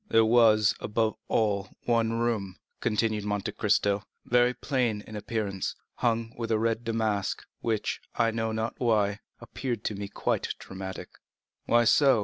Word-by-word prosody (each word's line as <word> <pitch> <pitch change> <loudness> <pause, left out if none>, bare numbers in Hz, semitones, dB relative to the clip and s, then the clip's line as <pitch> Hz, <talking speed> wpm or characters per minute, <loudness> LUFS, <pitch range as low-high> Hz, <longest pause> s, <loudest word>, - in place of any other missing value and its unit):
"There 115 0 +5
was, 110 -2 +5
above 110 0 0
all, 100 -3 +1 0.2
one 115 -1 +2
room," 115 -5 -1 0.2
continued 110 -2 0
Monte 105 0 -2
Cristo, 100 -1 +1 0.2
"very 125 0 +4
plain 125 -5 -1
in 110 - -9
appearance, 105 -2 -3 0.2
hung 115 -1 0
with 115 -1 -4
red 115 +1 +1
damask, 110 -4 -1
which, 110 -3 -1
I 115 -1 +2
know 115 0 -1
not 110 +1 -2
why, 105 -4 +2 0.2
appeared 120 -5 -4
to 105 - -2
me 100 0 -4
quite - - -1
dramatic." 95 0 -7 0.6
"Why 120 0 +5
so?" 135 +1 +5
110 Hz, 140 wpm, -28 LUFS, 105-115 Hz, 0.6 s, There